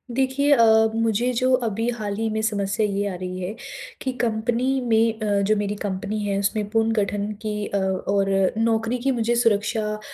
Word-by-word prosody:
देखिए 270 +2 +1
अ, 235 - +5 0.3
मुझे 230 +2 +1
जो 255 +2 +1
अभी 225 +2 -1
हाल 205 -2 -3
ही 225 0 -1
में 220 0 -2
समस्या 205 -1 0
ये 200 0 -1
आ 190 - -4
रही 185 0 -5
है 185 +4 -4 0.5
कि 260 - -1
कंपनी 240 +3 0
में 225 -2 +2
अ, 205 -2 +1
जो 210 +2 +2
मेरी 205 0 -2
कंपनी 200 +2 -3
है, 200 -1 -1
उसमें 205 +1 -1
पुनर्गठन 215 -2 0
की 210 -1 -3
अ, 200 - -2
और 195 +1 0 0.3
नौकरी 225 +1 +1
की 270 +3 0
मुझे 240 -1 0
सुरक्षा 215 -1 +1
215 Hz, 180 wpm, -23 LUFS, 200-230 Hz, 0.5 s, अ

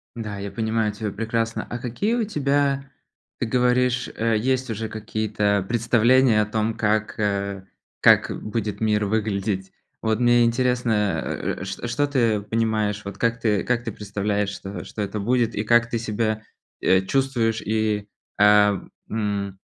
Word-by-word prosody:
Да, 105 -3 -5
я 100 0 -5
понимаю 110 -1 0
тебя 105 0 -4
прекрасно. 115 +2 -2
А 120 - -3
какие 125 - -1
у 240 - +1
тебя 140 -6 0 0.5
ты - - 0
говоришь, 125 +1 +2
э, 115 0 +1
есть 130 +3 0
уже 110 0 -3
какие-то 105 -2 -1
представления 120 0 +4
о - - +1
том, 110 +1 -1
как 110 -1 0
э 100 -2 -1 0.4
как - - +5
будет 105 -1 -3
мир 105 -1 +1
выглядеть? 100 -2 -1 0.3
Вот 110 0 0
мне 120 0 +5
интересно, 115 -3 +1
э - - -3
э - - -8
э - - -3
шт 95 +5 -5
что 145 +4 +1
ты 115 -7 +1
понимаешь, 110 -1 -1
вот 100 0 -6
как 115 +1 0
ты 105 -5 +1
как 120 -1 0
ты 115 - -4
представляешь? 105 0 -2
Что 100 0 -7
что 110 - -6
это 100 +1 -3
будет 120 +2 +1
и 105 - -1
как 120 +1 +3
ты 115 - -1
себя, 110 -1 -1 0.4
э, 95 0 +4
чувствуешь 115 0 0
и 110 -1 -1 0.3
ам 105 -1 +4 0.2
м, 100 -3 -2
110 Hz, 160 wpm, -23 LUFS, 105-120 Hz, 0.5 s, как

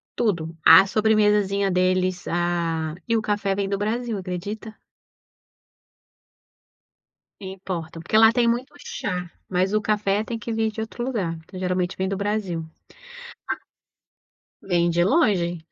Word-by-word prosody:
tudo. 165 -7 -1
A 165 +4 +9
sobremesazinha 210 -2 +2
deles, 185 0 +1
a 170 -2 -1
e 230 - +2
o 225 - +2
café 205 -2 0
vem 195 0 -2
do 200 - 0
Brasil, 225 +2 -2
acredita? 200 +4 -6 2.7
Importam. 185 -4 -6
Porque 215 - 0
lá 225 +1 +7
tem 240 -1 +2
muito 250 +5 -1
chá, 180 -11 -4 0.2
mas 185 +2 0
o 215 - +3
café 210 -1 +1
tem 230 0 -4
que 230 +1 -5
vir 220 0 0
de 220 - -7
outro 230 +2 -4
lugar, 205 -10 -2
então 165 +3 -11
geralmente 180 0 -1
vem 190 0 -1
do 195 - -2
Brasil. 200 -5 -2 2.0
Vem 175 -2 +1
de 175 +1 +2
longe. 190 - +2
195 Hz, 135 wpm, -24 LUFS, 175-215 Hz, 2.7 s, A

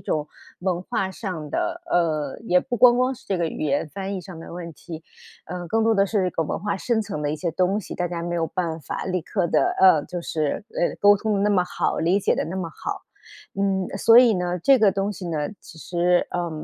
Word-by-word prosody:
种 150 -1 -2 0.3
文 180 -1 -1
化 190 0 -2
上 180 -7 -6
的， - - -2
呃， 155 -5 0
也 180 -3 +4
不 245 +6 -3
光 245 +1 +7
光 255 +1 +1
是 265 - -18
这 195 - 0
个 170 -1 0
语 - - -5
言 145 +1 0
翻 195 0 -4
译 - - -4
上 175 -3 -10
的 - - -10
问 170 -2 -7
题， 160 0 -9 0.4
呃， 175 0 -6
更 225 +3 +1
多 225 0 +3
的 195 0 +3
是 195 -3 0
一 - - -1
个 165 - -1
文 - - -3
化 205 +1 -2
深 230 -3 0
层 195 -8 -5
的 145 0 -1
一 155 - -2
些 170 +1 -2
东 185 +4 +1
西， 210 - -7
大 175 -1 -2
家 170 -1 -4
没 175 0 -3
有 165 -1 0
办 165 -1 -3
法 - - -5
立 185 -1 -1
刻 180 +1 -1
地 - - +2 0.2
呃， 175 -6 +6
就 175 - -5
是， 155 +5 -2
呃， 175 - -1
沟 205 0 +7
通 215 +1 -1
得 195 - 0
那 210 - +2
么 185 -3 +3
好、 - - -1
理 180 +5 +2
解 200 - +1
得 - - -1
那 185 +3 -5
么 170 -3 -3
好。 - - -6 0.6
嗯， 190 -2 +1
所 230 +4 +7
以 240 -4 +6
呢， 180 0 -1
这 270 +9 +5
个 210 -4 +5
东 195 +1 -1
西 180 -2 -7
呢， 150 -3 -2
其 160 - -14
实， 175 +2 +1
呃， 175 -1 -2
180 Hz, 265 characters per minute, -23 LUFS, 165-200 Hz, 0.6 s, 光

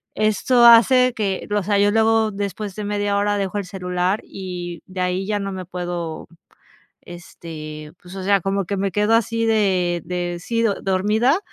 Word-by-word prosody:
esto 215 +4 +3
hace 250 +2 +7
que 195 -3 -2
o 205 - +2
sea, 205 +1 +1
yo 205 0 +4
luego, 225 0 +3
después 200 0 -4
de 210 - -5
media 205 0 -1
hora 205 0 +1
dejo 195 0 -2
el 195 - -5
celular 180 +1 -2
y 175 -3 -7
de 185 0 -5
ahí 180 +1 -1
ya 210 -1 0
no 195 0 -4
me 185 -1 -5
puedo, 175 -2 -5 0.8
este 155 -3 -9
pues, 180 +1 -12
o 190 - -5
sea, 200 -1 +3
como 195 +2 -1
que 200 - -2
me 195 0 -1
quedo 210 +2 +2
así 230 0 +1
de 185 -6 +1
de, 175 -1 -3
sí 230 +5 -1
do 210 -3 +2
dormida, 210 - +2
195 Hz, 180 wpm, -21 LUFS, 180-215 Hz, 0.8 s, hace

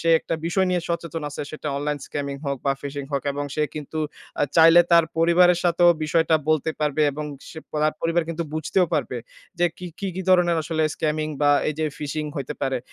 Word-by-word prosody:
সে 165 - -1
একটা 165 - -3
বিষয় 190 +2 +1
নিয়ে 180 -1 +1
সচেতন 170 -2 -3
আছে, 145 - -5
সেটা 155 -1 -5
online 145 0 -2
scamming 140 -1 -4
হোক 140 0 -1
বা 135 - +4
phishing 140 -1 -5
হোক। 140 - 0
এবং 145 +1 -3
সে 150 - 0
কিন্তু 150 +1 -6 0.4
আ - - +3
চাইলে 165 +1 +8
তার 170 -1 +7
পরিবারের 175 +1 +5
সাথেও 175 0 +4 0.2
বিষয়টা 160 +1 +2
বলতে 155 0 +2
পারবে 150 0 +1
এবং 150 +1 -5 0.3
সে 160 - -9
পো - - -5
তার 155 0 +2
পরিবার 165 +1 +1
কিন্তু 165 0 -2
বুঝতেও 175 +3 +1
পারবে। 130 -4 -1 0.4
যে 175 - +4
কী 180 - -6
কী, 200 - -3
কী 190 - -3
ধরনের 175 -2 +4
আসলে 160 0 -1
scamming 155 0 -1
বা 145 - +5 0.2
এই 155 - -2
যে 155 - 0
phishing 150 +1 -3
হইতে 140 +1 -4
পারে 135 -2 0
155 Hz, 210 wpm, -23 LUFS, 145-170 Hz, 0.4 s, চাইলে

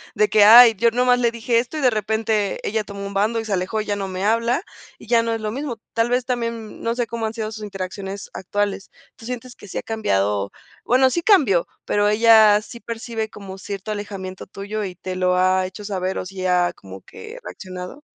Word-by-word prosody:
De 425 -1 +3
que: 210 - +5
"Ay, 230 +1 +10
yo 235 +4 +4
nada 245 +2 0
más 250 0 +4
le 240 -1 +3
dije 235 0 +1
esto, 250 +6 -4
y - - -2
de 255 -2 +4
repente 215 -1 -1
ella 220 +1 -1
tomó 200 -1 -7
un 200 - -6
bando 215 +4 +1
y 225 - -5
se 215 - -2
alejó, 190 +4 -1
y 215 - -7
ya 205 - -1
no 195 -1 -4
me 185 0 -4
habla, 230 - +1 0.3
y - - -14
ya 235 0 +4
no 230 0 -2
es 225 - -2
lo 215 0 -2
mismo". 265 -1 -4 0.2
Tal 230 +1 +1
vez 250 0 +1
también, 230 -3 -4
no 230 0 -1
sé, 240 -1 0
¿cómo 230 -1 -3
han 220 - -5
sido 220 -1 -4
sus 215 -1 -8
interacciones 195 0 -6
actuales? 200 +1 -3 0.3
¿Tú 225 - -14
sientes 250 0 -6
que - - -14
sí - - -6
ha - - -3
cambiado? 100 - 0 0.3
Bueno, 260 +2 +4
sí 340 - 0
cambió, 275 - +4 0.2
¿pero 205 0 +2
ella 215 -1 +6
sí 235 - -11
percibe 225 -1 -5
como 195 -2 -10
cierto 200 +1 -6
alejamiento 195 -3 -6
tuyo 205 +3 -5
y 185 -3 -5
te 185 +1 -6
lo 180 0 +1
ha 185 0 +2
hecho 190 +2 -10
saber, 190 -2 -2
o - - -3
sí 185 0 -4
ha 180 -1 +2
como 95 0 -12
que 450 +2 -11
reaccionado? 185 - -8
215 Hz, 230 wpm, -21 LUFS, 195-230 Hz, 0.3 s, Ay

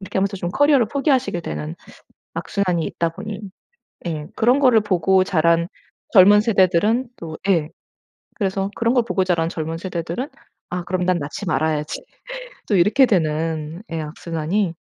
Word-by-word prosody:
이렇게 190 0 -4
하면서 195 +1 0
좀 175 -1 -3
커리어를 280 -1 +4
포기하시게 265 - +1
되는 75 - -5 0.6
악순환이 180 -5 -1
있다 170 -1 -1
보니 205 +4 -7 0.7
예 155 -3 -3
그런 250 +5 +3
거를 250 -5 +5
보고 190 -1 +2
자란 170 -1 +2 0.4
젊은 205 +1 +8
세대들은 210 +3 +2
또 160 -1 -7
예 165 -5 +2 0.7
그래서 195 -1 -1
그런 230 +2 +1
걸 245 -2 +3
보고 190 -5 0
자란 170 -3 +1
젊은 165 0 -4
세대들은 180 - -4 0.4
'아 180 -1 -3
그럼 180 0 -1
난 180 -1 +2
낳지 150 +7 -6
말아야지.' 155 -2 -1 0.6
또 210 - +2
이렇게 210 +9 +5
되는 160 -1 -1
예 165 - -2
악순환이 165 +4 -2
185 Hz, 325 characters per minute, -21 LUFS, 165-210 Hz, 0.7 s, 젊은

